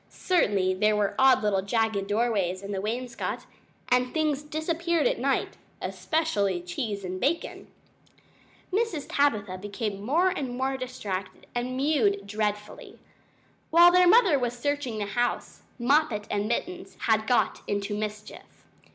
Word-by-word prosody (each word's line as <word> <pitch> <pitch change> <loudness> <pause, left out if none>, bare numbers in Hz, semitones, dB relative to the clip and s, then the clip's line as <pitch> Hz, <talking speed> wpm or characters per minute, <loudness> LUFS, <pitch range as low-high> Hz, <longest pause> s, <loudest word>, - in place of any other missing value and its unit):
Certainly 200 - +1
there 210 +3 +2
were 205 -1 0
odd 265 -3 +5
little 200 -2 +2
jagged 210 -1 0
doorways 205 -4 0
in 200 - -6
the 195 -1 -2
wainscot, 235 +3 -4 0.4
and 250 0 +2
things 305 -3 +1
disappeared 330 +4 -1
at - - +1
night - - -1 0.2
especially 210 - -1
cheese 200 +4 -4
and 185 0 -5
bacon. 300 +6 -1 1.1
Mrs. 390 -9 0
Tabitha 210 -10 0
became 205 0 -4
more 320 - +2
and 270 -9 -4
more 265 +1 -1
distracted 210 -8 -5
and 250 +1 -3
mewed 235 -9 +1
dreadfully. 210 0 -4 0.7
While 345 +2 +7
their 360 0 +5
mother 370 - +5
was 245 -1 -2
searching 285 -3 -2
the 210 - -2
house, 240 +4 -2 0.2
Moppet 245 -4 +2
and 205 0 0
Mittens 360 +10 -4
had 220 -1 +1
got 245 - +1
into 205 0 -2
mischief. 210 0 -7
235 Hz, 135 wpm, -27 LUFS, 205-290 Hz, 1.1 s, While